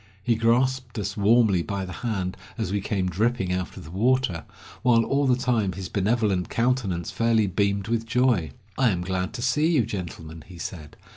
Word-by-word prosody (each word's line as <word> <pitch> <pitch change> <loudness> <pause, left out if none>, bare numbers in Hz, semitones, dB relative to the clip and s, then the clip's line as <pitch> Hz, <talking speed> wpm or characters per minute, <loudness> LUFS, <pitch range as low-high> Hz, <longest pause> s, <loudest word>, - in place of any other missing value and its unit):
He 120 - +2
grasped 120 +2 +1
us 105 - -3
warmly 105 -3 +4
by 100 +2 -3
the 95 - -8
hand 95 -5 -3 0.2
as 110 -5 -2
we 100 0 0
came 95 -1 -1
dripping 95 0 0
out 90 -1 -4
of - - -8
the 80 - -11
water, 110 - +1 0.4
while 120 -2 +4
all 140 0 +1
the 125 - +4
time 120 -6 0
his 95 0 -6
benevolent 100 -2 0
countenance 115 -8 0
fairly 115 -2 +2
beamed 100 +1 0
with 115 0 -1
joy. 120 - +2 0.3
"I 130 -3 +5
am 90 -4 -1
glad 95 0 -2
to 120 -1 -5
see 150 +5 +2
you, 130 -8 +3
gentlemen," 85 -6 -7
he 90 - -12
said. 80 -3 -7
105 Hz, 190 wpm, -25 LUFS, 95-120 Hz, 0.4 s, I